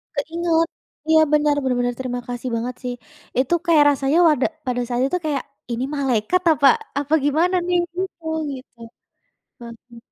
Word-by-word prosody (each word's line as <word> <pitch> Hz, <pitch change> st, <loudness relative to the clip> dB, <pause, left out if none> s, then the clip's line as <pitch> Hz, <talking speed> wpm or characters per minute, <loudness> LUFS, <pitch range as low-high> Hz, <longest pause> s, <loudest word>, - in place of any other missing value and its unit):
Keinget, 330 Hz, +3 st, 0 dB, 0.4 s
iya 315 Hz, 0 st, +6 dB
bener, 295 Hz, -1 st, +3 dB
benar-benar 245 Hz, -1 st, 0 dB
terima 245 Hz, -1 st, -3 dB
kasih 245 Hz, +1 st, -4 dB
banget 240 Hz, +2 st, -3 dB
sih. 250 Hz, 0 st, -3 dB, 0.4 s
Itu 260 Hz, +6 st, +1 dB
kayak 320 Hz, -3 st, +5 dB
rasanya 275 Hz, +3 st, +1 dB
wada 295 Hz, -5 st, +3 dB, 0.2 s
pada 245 Hz, 0 st, 0 dB
saat 245 Hz, 0 st, -1 dB
itu 360 Hz, -, -1 dB
kayak, 285 Hz, -3 st, -1 dB, 0.3 s
"Ini 235 Hz, +2 st, -2 dB
malaikat 265 Hz, +6 st, +1 dB
apa 280 Hz, -2 st, +4 dB, 0.3 s
apa 290 Hz, +2 st, -3 dB
gimana 335 Hz, +6 st, +2 dB
nih?" 355 Hz, 0 st, +2 dB, 0.2 s
Gitu 370 Hz, -2 st, -5 dB, 0.3 s
gitu. 255 Hz, -2 st, -10 dB, 0.8 s
Mhm. 235 Hz, 0 st, -12 dB
275 Hz, 150 wpm, -21 LUFS, 245-320 Hz, 0.8 s, iya